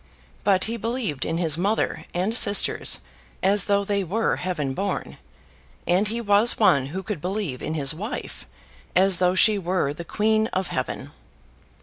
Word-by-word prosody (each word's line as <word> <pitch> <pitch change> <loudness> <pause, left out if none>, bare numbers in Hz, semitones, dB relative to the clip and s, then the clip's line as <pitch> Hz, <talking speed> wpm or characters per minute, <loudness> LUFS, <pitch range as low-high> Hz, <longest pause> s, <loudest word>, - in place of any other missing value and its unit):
But 190 -2 +3
he 230 +1 -2
believed 230 - -2
in 165 - -1
his 165 -2 0
mother 205 +5 -1
and 185 +5 -1
sisters 205 -4 +2 0.4
as 195 0 +4
though 200 0 +2
they 200 0 -1
were 215 +6 0
heaven 155 -7 -2
born; 195 +5 -3 0.7
and 185 +4 +2
he 230 +3 -2
was 210 +1 +3
one 140 - +4
who 185 +7 -5
could 200 -8 -5
believe 180 -8 -3
in 155 - -3
his 140 -2 0
wife 210 - -6 0.5
as 190 0 +4
though 180 0 +2
she 210 +1 +5
were 175 -6 -1
the 170 - -7
queen 215 +4 +1
of 185 -1 -1
heaven. - - -4
190 Hz, 160 wpm, -24 LUFS, 170-210 Hz, 0.7 s, she